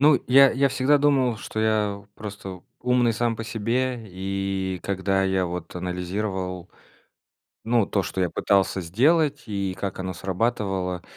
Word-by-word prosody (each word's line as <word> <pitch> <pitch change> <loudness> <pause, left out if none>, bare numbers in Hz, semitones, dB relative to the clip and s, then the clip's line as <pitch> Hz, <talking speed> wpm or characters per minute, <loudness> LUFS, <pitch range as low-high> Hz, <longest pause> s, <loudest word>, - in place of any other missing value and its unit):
Ну, 145 -1 +5
я 135 +1 +7
я 140 +3 +3
всегда 135 +2 +3
думал, 135 -5 +2
что 110 - -6
я 105 -2 0
просто 100 -3 -8 0.2
умный 125 -1 +2
сам 115 +1 0
по 115 - -5
себе. 115 +2 -1
И 95 0 -3
когда 95 0 0
я 95 -1 +1
вот 85 -1 -6
анализировал, 90 0 -3 0.9
ну, 115 -2 +2
то, 100 - 0
что 95 +2 -4
я 90 - +1
пытался 95 -1 +1
сделать 145 - +2
и 100 -3 -3
как 100 -2 -4
оно 95 0 -3
срабатывало, 95 -1 -2
100 Hz, 145 wpm, -24 LUFS, 95-120 Hz, 0.9 s, я